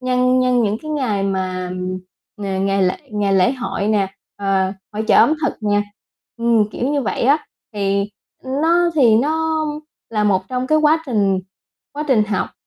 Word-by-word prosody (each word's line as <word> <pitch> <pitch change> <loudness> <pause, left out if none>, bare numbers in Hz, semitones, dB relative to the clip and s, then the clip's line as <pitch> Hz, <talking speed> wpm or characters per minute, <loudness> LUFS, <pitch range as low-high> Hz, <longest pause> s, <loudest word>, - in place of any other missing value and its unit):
nhân 255 0 +2
nhân 250 -1 +2
những 210 0 0
cái 310 - -6
ngày 240 -10 -1
mà 185 -2 -2 0.7
ng 195 -1 -2
ngày 195 0 +1
lễ 185 0 +1 0.2
ngày 205 -1 0
lễ 190 +5 +4
hội 210 -5 -3
nè, 195 -3 0 0.2
ờ, 195 -1 0 0.2
hội 215 +1 -3
chợ - - +5
ẩm 310 - +6
thực - - +1
nè 205 0 +2 0.5
ừm, 230 -3 +2
kiểu 250 +5 -2
như 285 - 0
vậy 215 - -2
á, 285 +5 +2 0.3
thì, 200 0 0 0.3
ưm, 265 +3 -2
nó 340 +1 +3
thì 240 -7 +5
nó 315 +4 0 0.5
là 210 -2 0
một 190 -2 +2
trong 255 0 -2
cái 310 +2 +3
quá 310 +1 +3
trình 200 -6 +1 0.5
quá 295 +1 -4
trình 220 -6 +4
học. 205 -2 -2
215 Hz, 180 wpm, -19 LUFS, 195-265 Hz, 0.7 s, ẩm